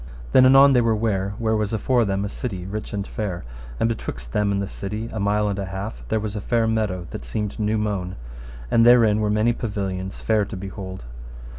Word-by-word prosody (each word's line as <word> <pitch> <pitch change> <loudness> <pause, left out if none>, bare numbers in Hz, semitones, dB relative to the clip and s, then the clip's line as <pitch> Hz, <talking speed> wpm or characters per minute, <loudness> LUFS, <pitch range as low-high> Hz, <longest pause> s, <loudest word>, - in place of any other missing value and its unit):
Then 130 0 +7
anon 135 +1 +7
they 125 - +5
were 115 -1 +2
ware 100 -3 -1
where 110 -2 +1
was 105 0 -1
afore 120 +2 +2
them 100 0 -1
a - - -3
city 95 -6 -5
rich 105 +3 -5
and 100 -2 -3
fair. 100 -6 -4 0.4
And - - +3
betwixt 60 - -5
them 105 -1 +2
and 100 - 0
the 100 - -2
city 105 +4 -5
a 110 - -3
mile 105 +1 +1
and 100 -1 -2
an 100 - -3
half 95 +4 -5
there 110 - 0
was 105 0 -4
a 105 - -3
fair 115 +2 +1
meadow 105 -5 -1
that - - -6
seemed 105 - -4
new 105 +1 +1
mown, 100 -4 -2 0.6
and 115 - +5
therein 115 -3 +6
were 105 -1 +1
many 110 +3 +2
pavilions 95 -4 -4
fair 110 -2 +2
to 100 0 -6
behold. 95 - -7
105 Hz, 220 wpm, -23 LUFS, 100-110 Hz, 0.6 s, Then